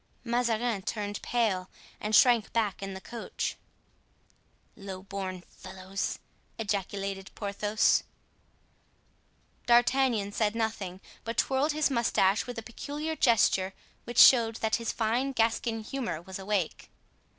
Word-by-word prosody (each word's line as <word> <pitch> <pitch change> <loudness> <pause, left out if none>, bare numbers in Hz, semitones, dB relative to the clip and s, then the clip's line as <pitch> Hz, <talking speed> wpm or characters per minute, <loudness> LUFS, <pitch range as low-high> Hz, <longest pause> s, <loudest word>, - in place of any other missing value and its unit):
Mazarin 235 -3 0
turned 205 +1 -4
pale 205 -6 0 0.3
and 210 +1 0
shrank 240 -3 +5
back 215 -5 0
in 195 -1 -5
the - - -6
coach. 235 +3 -4 1.2
"Low 195 -2 -8
born 190 -2 -5
fellows!" 190 +1 -5 0.4
ejaculated 195 -2 -3
Porthos. 205 +1 +2 1.7
D'Artagnan 240 -3 +3
said 210 +1 0
nothing, 210 -5 -3 0.2
but 230 +1 -5
twirled 275 +3 +2
his 305 -1 +1
mustache 215 -4 +2
with 245 - -6
a 225 - -5
peculiar 295 +7 -5
gesture 195 -7 +3 0.3
which 240 0 -7
showed 230 -3 +7
that 220 -1 0
his 230 -1 -2
fine 240 +5 0
Gascon 225 -1 0
humor 235 -8 -3
was 190 +3 -8
awake. 195 -3 -2
220 Hz, 115 wpm, -29 LUFS, 195-240 Hz, 1.7 s, showed